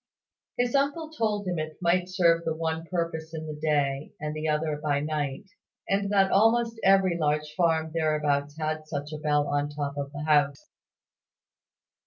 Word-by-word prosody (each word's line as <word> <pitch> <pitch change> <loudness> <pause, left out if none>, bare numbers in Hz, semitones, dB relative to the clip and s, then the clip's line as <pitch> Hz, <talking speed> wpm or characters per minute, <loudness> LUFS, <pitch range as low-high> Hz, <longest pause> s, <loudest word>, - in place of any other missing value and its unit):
His 245 -1 +1
uncle 285 +3 0
told 215 -8 -1
him 175 -3 -1
it 155 0 -5
might 180 +1 +1
serve 170 -3 +3
the 160 -1 -1
one 160 0 -3
purpose 165 -2 -3
in 160 0 -5
the 155 - -5
day, 145 -2 -1
and 150 0 -3
the 155 +1 -3
other 150 0 0
by 145 -1 0
night; 150 +1 -2 0.4
and 200 0 0
that 195 -1 +4
almost 225 +2 +3
every 190 -3 +4
large 150 0 0
farm 160 -2 +1
thereabouts 150 -2 0
had 155 0 -3
such 145 0 -5
a 155 - -5
bell 150 -1 +1
on 145 0 0
the 145 - -12
top 145 -1 -3
of 140 0 -4
the 145 +1 -6
house. 145 -2 +1
155 Hz, 175 wpm, -27 LUFS, 150-180 Hz, 0.4 s, that